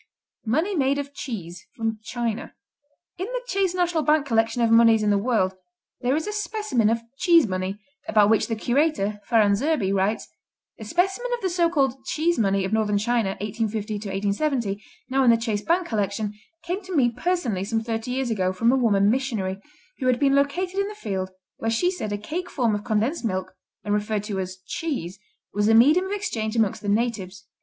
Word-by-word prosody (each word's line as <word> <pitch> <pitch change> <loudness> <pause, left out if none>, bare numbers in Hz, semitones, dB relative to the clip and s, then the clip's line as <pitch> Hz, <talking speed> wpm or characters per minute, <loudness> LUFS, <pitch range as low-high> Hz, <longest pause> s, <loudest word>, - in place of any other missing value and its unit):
Money 320 - +1
made 275 -2 +2
of 285 0 -5
cheese 185 -11 -7 0.3
China 230 -1 -4 0.6
In 375 - -2
the - - -3
Chase 390 -6 0
National 350 -3 +1
Bank 305 -1 +3
collection 230 -1 +1
of 230 - +3
moneys 230 -1 +6
of 210 - +3
the 205 - +3
world 205 -4 +1 0.5
there 250 +2 +1
is 315 - -1
a 420 - -3
specimen 420 - 0
of 230 +1 0 0.2
"Cheese 340 -4 +5
money" 185 0 -3 0.3
about 210 -1 +4
which 220 - +3
the 225 - -1
curator, 240 -4 0
Farran 215 -4 +4
Zerbee, 230 -5 0
writes: 200 +3 0 0.5
"A 220 - -7
specimen 385 - 0
of 475 - -11
the 375 - -1
so 340 -1 +2
called 270 -5 0
'cheese 330 +5 0
money' 195 -2 +2
of 195 - -3
Northern 210 -2 +2
China, 220 -2 0
1850 210 -2 -2
70, 230 -6 -1 0.2
now 270 +1 +2
in 250 - +5
the 230 - +6
Chase 225 -3 -2
Bank 345 - +1
collection, 205 -1 -1 0.3
came 360 +4 -3
to 375 -2 -6
me 245 -5 +4
personally 250 - -1
some 225 +2 -1
thirty 225 +1 -3
years 255 -1 -1
ago 185 -4 +1
from 230 +6 +2
a - - +3
woman 205 -6 +3
missionary, 215 -6 0 0.4
who 255 - -1
had 250 -1 +3
been 275 -1 +3
located 355 +7 +1
in 395 - +1
the 420 - -7
field 190 - -3 0.3
where 225 - -2
she 290 +11 +2
said 285 - -4
a 205 - -1
cake 340 - -5
form 240 -5 +1
of 205 0 -2
condensed 225 +10 0
milk, 185 -4 -2 0.3
and 205 - -1
referred 210 0 -1
to 205 -2 -3
as 185 0 -4
'cheese,' 195 - -4 0.3
was 205 +1 +1
a 225 - +5
medium 300 +11 +6
of - - -6
exchange 230 - -2
among 220 -4 +3
the 205 - -3
natives. 205 -4 -1
230 Hz, 195 wpm, -24 LUFS, 205-300 Hz, 0.6 s, moneys